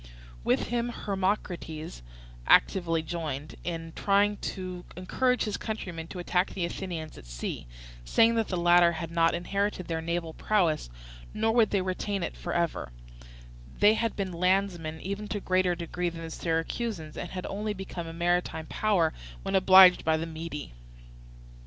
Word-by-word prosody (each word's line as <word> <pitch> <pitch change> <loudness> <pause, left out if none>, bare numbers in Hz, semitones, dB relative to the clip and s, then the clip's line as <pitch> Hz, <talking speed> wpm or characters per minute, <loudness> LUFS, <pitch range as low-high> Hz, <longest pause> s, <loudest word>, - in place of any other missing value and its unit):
With - - +1
him 240 0 0
Hermocrates 185 - -3 0.5
actively 165 -4 +4
joined 155 -3 -4
in 165 -1 -4
trying 205 +1 +2
to 185 -3 -5
encourage 250 +7 +1
his 210 -2 -2
countrymen 175 -7 -5
to 185 - -8
attack 180 +1 +1
the 180 - -2
Athenians 170 -3 -5
at - - -14
sea, - - -5 0.4
saying 225 - +4
that 225 -2 +1
the 185 - -2
latter 175 0 +5
had 165 0 -5
not 165 0 +3
inherited 195 +2 -1
their 165 -1 -2
naval 165 0 -2
prowess 170 - +1 0.5
nor 220 +1 +2
would 225 -3 +4
they 195 -2 +1
retain 190 +1 -2
it - - -4
for 175 - -5
ever; 170 - -1 0.9
they 210 +1 +6
had 230 0 -1
been 190 -3 -3
landsmen 175 -3 0
even 200 +2 -4
to 205 - -2
a - - -6
greater 185 -1 +2
degree 175 +1 -2
than 165 -1 -8
the 165 - -6
Syracusans, 165 +1 -2
and 175 - -5
had 185 -1 -5
only 210 +1 -3
become 185 -3 -6
a - - -6
maritime 175 -1 0
power 180 -4 +1 0.3
when - - -3
obliged 190 -1 +8
by 160 0 +2
the 160 - -3
Mede. 160 - -6
180 Hz, 160 wpm, -28 LUFS, 165-200 Hz, 0.9 s, obliged